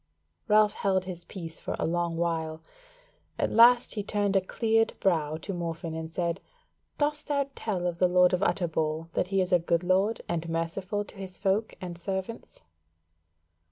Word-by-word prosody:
Ralph 210 0 +5
held 190 -2 0
his 175 -2 -7
peace 165 -4 -8
for - - -4
a - - -1
long 170 0 -1
while; 160 -2 -2 0.7
at - - 0
last 240 +2 +6
he 210 - -2
turned 205 -1 0
a 195 - +5
cleared 225 +3 +1
brow 155 -5 +1
to 195 +4 -6
Morfinn 165 -1 -4
and 160 0 -5
said; 170 +2 -2 0.6
"Dost 295 0 -1
thou 280 -2 +1
tell 190 -8 -2
of 175 -1 -2
the 180 - +5
Lord 180 0 +4
of 180 - +1
Utterbol 160 -4 0
that - - 0
he 195 0 +1
is 185 +1 -1
a 180 - +5
good 170 +1 0
lord 190 +5 +2
and 170 -1 -2
merciful 180 +5 -2
to - - -12
his 190 -1 -7
folk 205 +2 0
and 175 -2 -7
servants?" 190 - -5
180 Hz, 175 wpm, -28 LUFS, 165-205 Hz, 0.7 s, last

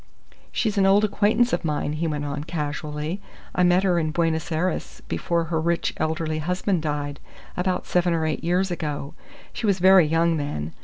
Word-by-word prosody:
"She's 215 -3 0
an 195 - +4
old 200 +2 +5
acquaintance 215 +4 +2
of - - 0
mine," 150 -1 -1
he 160 +2 -1
went 150 -2 -2
on, 145 0 -3
casually. 150 +2 -4 0.3
"I - - +1
met 180 +1 +4
her 180 -3 +3
in 155 -1 0
Buenos 160 0 0
Aires 170 +4 -2
before 170 -1 0
her 160 0 -1
rich 170 +1 0
elderly 155 0 -1
husband 180 +2 0
died, 145 -2 -3 0.4
about 180 0 -1
seven 180 0 +1
or 165 -1 +1
eight 155 - -2
years 180 +3 +1
ago. 150 -3 -4 0.4
She 235 -2 -2
was 200 -2 +3
very 185 -2 +6
young 165 +1 +2
then. 80 - -4
165 Hz, 185 wpm, -24 LUFS, 150-180 Hz, 0.4 s, very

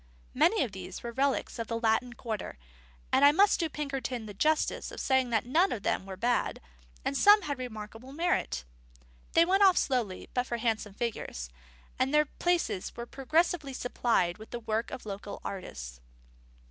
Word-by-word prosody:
Many 430 +3 +4
of 240 - -4
these 185 -1 -8
were 235 - -4
relics 270 0 0
of 230 - -3
the 230 -1 -2
Latin 230 +2 +1
Quarter, 220 - -5 0.5
and 270 - +4
I 285 - +9
must 400 +6 +4
do 330 -2 0
Pinkerton 270 -5 -3
the 210 - -8
justice 305 +10 +1
to - - -10
say 265 -1 +3
that 230 -3 0
none 335 +10 +3
of 210 -5 -3
them 190 - -1
were 190 -1 -7
bad, 240 +4 0 0.5
and - - 0
some 415 - +7
had 285 -4 -3
remarkable 225 +1 -7
merit. 330 - 0 0.7
They 330 - +6
went 385 +3 +3
off 380 -2 +7
slowly 235 -8 0
but 250 0 0
for 235 - -2
handsome 220 -3 -1
figures; 135 - -4 0.5
and 260 +1 +2
their 300 0 +4
places 340 - -1
were 235 - -4
progressively 300 +3 0
supplied 230 -7 0
with 220 - -11
the 240 - -5
work 220 +1 -1
of 245 - -7
local 200 0 -6
artists. 60 - -6
245 Hz, 175 wpm, -30 LUFS, 215-295 Hz, 0.7 s, I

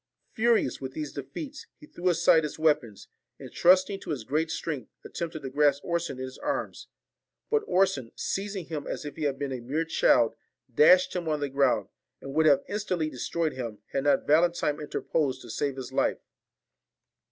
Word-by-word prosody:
Furious 225 - +2
with 130 -1 -5
these 150 -2 -5
defeats, 265 - -7
he 300 - -14
threw 180 -10 -2
aside 165 -1 +5
his 150 - -4
weapons, 150 -9 0 0.3
and - - -10
trusting 185 +2 +4
to - - -10
his 140 -7 -3
great 155 +7 -1
strength, 145 -8 -4 0.2
attempted 165 -3 -5
to 135 - -4
grasp 145 0 +2
Orson 170 -5 -2
in 130 - -5
his 130 0 -8
arms: - - -3 0.6
but 445 -1 +3
Orson, 160 -11 +1
seizing 195 -2 -3
him 155 -3 -5
as - - -4
if 145 - -6
he 155 - -3
had 140 -2 0
been 140 -1 -3
a 130 - -3
mere 145 +7 -2
child, 120 -7 +3 0.4
dashed 180 +9 +6
him 175 -3 -2
on 150 -1 0
the 145 -1 -2
ground, 135 -1 +1 0.3
and 135 - -8
would 155 +1 +4
have 145 -2 +5
instantly 180 -7 -2
destroyed 160 +5 -2
him, 115 -5 -5
had 135 +1 -1
not 140 -2 +3
Valentine 160 -1 +2
interposed 145 -2 -2
to 120 - -9
save 140 +3 -1
his 130 -2 -7
life. - - +1
150 Hz, 185 wpm, -27 LUFS, 135-170 Hz, 0.6 s, dashed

